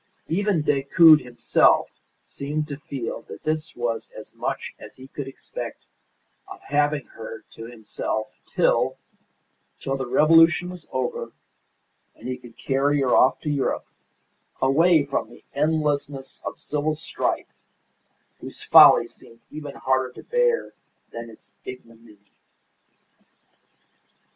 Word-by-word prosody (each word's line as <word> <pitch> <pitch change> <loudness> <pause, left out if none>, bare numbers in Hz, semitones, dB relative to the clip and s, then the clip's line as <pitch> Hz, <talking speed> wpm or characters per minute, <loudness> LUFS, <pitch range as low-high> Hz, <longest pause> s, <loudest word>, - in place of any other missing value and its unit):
Even 195 -2 +1
Decoud 150 +3 +6
himself 125 -1 +3 0.4
seemed 150 +2 -4
to 140 - -5
feel 135 -5 -5
that - - -10
this 155 0 -2
was 120 -2 -3
as - - -10
much - - -4
as - - -12
he 130 0 -12
could 140 0 -7
expect 135 - -8 0.6
of - - -10
having 145 -1 0
her 110 -1 -10
to 115 - -10
himself 110 -1 -4 0.2
till - - +1 0.8
till 135 - -2
the 130 -2 -4
revolution 165 +6 +5
was 180 -3 -11
over 130 -1 -3 0.8
and - - -10
he 130 - -2
could 120 -2 -15
carry 140 +2 +1
her 130 -2 +3
off 130 - +4
to 150 - -3
Europe, 140 -2 -1 0.7
away 155 +3 +4
from 140 - -2
the - - -16
endlessness 145 -2 -1
of - - -5
civil 150 +1 -2
strife, 160 - -3 0.9
whose - - -9
folly - - +8
seemed 115 0 -15
even 150 -2 -7
harder 130 -1 0
to - - -12
bear 485 -1 +1 0.4
than 115 0 -7
its 105 -2 -16
ignominy. 115 -3 -12
140 Hz, 125 wpm, -24 LUFS, 125-155 Hz, 0.9 s, folly